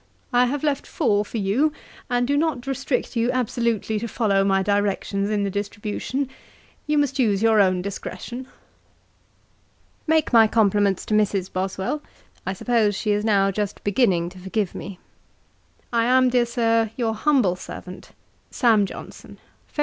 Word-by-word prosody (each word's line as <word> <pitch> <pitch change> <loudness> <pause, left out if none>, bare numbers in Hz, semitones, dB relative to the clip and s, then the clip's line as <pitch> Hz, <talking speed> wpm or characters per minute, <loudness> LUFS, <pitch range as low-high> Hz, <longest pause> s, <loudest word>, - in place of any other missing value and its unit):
I 245 +1 +4
have 285 +3 -3
left 290 -2 -1
four 210 -9 +1
for 220 - -6
you, 220 +10 +1 0.4
and 245 0 +1
do 285 - +1
not 290 -4 0
restrict 270 -2 -2
you 230 +1 +1
absolutely 235 -3 -1
to 235 - -4
follow 205 -4 +1
my 195 -1 +2
directions 200 0 0
in 210 -1 0
the 200 - -1
distribution. 210 +6 -3 0.6
You 300 0 +1
must 280 -1 +1
use 210 -4 +2
your 220 -2 +5
own 185 -2 +2
discretion. 220 +6 -6 1.6
'Make 315 -4 +2
my 225 -2 +7
compliments 205 -3 +2
to - - -3
Mrs. 200 -3 +1
Boswell: 190 +9 -2 0.5
I 190 - 0
suppose 215 0 +1
she 210 +2 -1
is 205 0 +1
now 200 -3 +3
just 205 0 -4
beginning 195 -6 +2
to 185 +1 -13
forgive 190 +1 -2
me. 195 -2 -7 1.0
'I 230 -1 +3
am, 255 +1 +4
dear 245 -1 +2
Sir, 230 -2 +1
your 230 -3 0
humble 225 -6 +2
servant, 180 0 -9 0.4
'SAM. 220 -5 +3
JOHNSON.' - - -10 0.3
'Feb. - - -10
220 Hz, 155 wpm, -23 LUFS, 200-245 Hz, 1.6 s, my